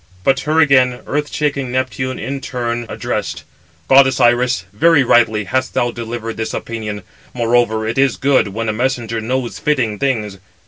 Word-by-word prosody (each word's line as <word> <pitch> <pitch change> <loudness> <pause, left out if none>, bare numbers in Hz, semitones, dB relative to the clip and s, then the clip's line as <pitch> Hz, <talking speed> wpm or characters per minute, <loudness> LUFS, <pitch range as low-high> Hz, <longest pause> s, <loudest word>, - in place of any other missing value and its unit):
But 135 +5 +3
her 155 +2 0
again 130 -5 +4
earth 150 0 -2
shaking 140 -4 -2
Neptune 130 0 -2
in 135 +1 -4
turn 120 -3 -3
addressed: - - -4 0.4
"Goddess 135 -1 +5
Iris, 120 -5 +2
very 150 +6 +4
rightly 115 -3 +3
hast 130 +5 -2
thou 120 0 +1
delivered 115 -1 -6
this 110 0 -3
opinion; 105 -3 -5 0.3
moreover, 115 -2 +1
it 115 +4 -1
is 135 -3 +2
good 135 -5 +2
when 110 +3 -4
a 110 - 0
messenger 120 -1 -2
knows 125 +2 -3
fitting 120 -9 0
things. 110 -8 -1
120 Hz, 155 wpm, -17 LUFS, 115-130 Hz, 0.4 s, Goddess